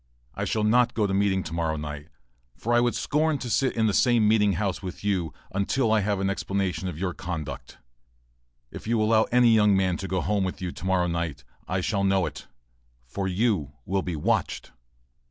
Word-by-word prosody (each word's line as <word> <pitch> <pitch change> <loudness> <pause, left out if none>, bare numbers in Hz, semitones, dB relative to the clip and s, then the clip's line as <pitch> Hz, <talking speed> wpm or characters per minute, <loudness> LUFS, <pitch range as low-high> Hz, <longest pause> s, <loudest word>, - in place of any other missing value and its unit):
I - - -3
shall 110 - 0
not 120 +3 +3
go 110 - +2
to 95 - -1
meeting 95 -1 +1
to 80 - -7
morrow, 80 -2 -1 0.8
for 120 - -1
I 120 - +5
would 120 0 +1
scorn 155 +1 +1
to 125 -3 -5
sit 130 +2 +1
in 110 - +3
the 105 - +2
same 120 0 +4
meeting 105 -2 +4
house 95 +1 -2
with 95 -1 -7
you 95 -6 0 0.2
until 110 +5 +1
I 110 - +4
have 100 -1 0
an 95 - 0
explanation 95 -3 -2
of 85 -4 -5
your 90 0 -2
conduct. 80 -5 -6 0.9
If - - -9
you 115 0 +1
allow 110 +1 +3
any 120 -1 +4
young 105 -3 +4
man 95 -2 +1
to 95 - -5
go 95 0 -1
home 100 +4 0
with 95 - -3
you 90 -1 -3
to 90 - -9
morrow 95 -1 +2
night, 85 -4 -3 0.2
I 90 +1 -1
shall 100 +1 0
know 95 -2 +2
it, - - -7 0.6
for 95 +11 -3
you 95 - 0
will 95 +1 0
be 90 -2 -4
watched. 75 - -1
100 Hz, 205 wpm, -26 LUFS, 90-110 Hz, 0.9 s, I